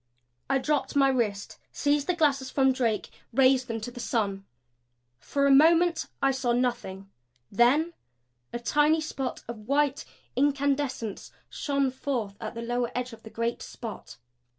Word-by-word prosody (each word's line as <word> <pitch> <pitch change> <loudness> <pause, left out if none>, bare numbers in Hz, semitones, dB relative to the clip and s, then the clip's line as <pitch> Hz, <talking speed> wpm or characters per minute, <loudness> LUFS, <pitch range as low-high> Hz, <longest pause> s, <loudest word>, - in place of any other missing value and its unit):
I 270 - +3
dropped 275 0 -1
my 275 -1 +5
wrist; 220 -6 -1
seized 290 0 +1
the 360 - +1
glasses 275 -5 +1
from 265 -1 +3
Drake; 235 -4 -1 0.2
raised 260 +1 +4
them 230 -2 -3
to 245 - -5
the 245 - -10
sun. 200 -5 -1 0.7
For 280 - 0
a 280 - +5
moment 330 +4 +5 0.2
I 275 - +5
saw 260 -2 0
nothing 235 -6 -2 0.4
then 275 +10 +3 0.6
a - - -3
tiny 295 +6 +2
spot 275 -5 -4
of 220 -2 -8
white 285 +1 +1 0.3
incandescence 275 -5 0 0.2
shone 280 -2 0
forth 250 -6 -3
at 220 +1 -5
the 230 - -5
lower 240 0 -1
edge 250 -1 -3
of 225 - -12
the 220 - -11
great 230 +1 -2
spot. 225 -3 -8
260 Hz, 150 wpm, -27 LUFS, 235-285 Hz, 0.7 s, my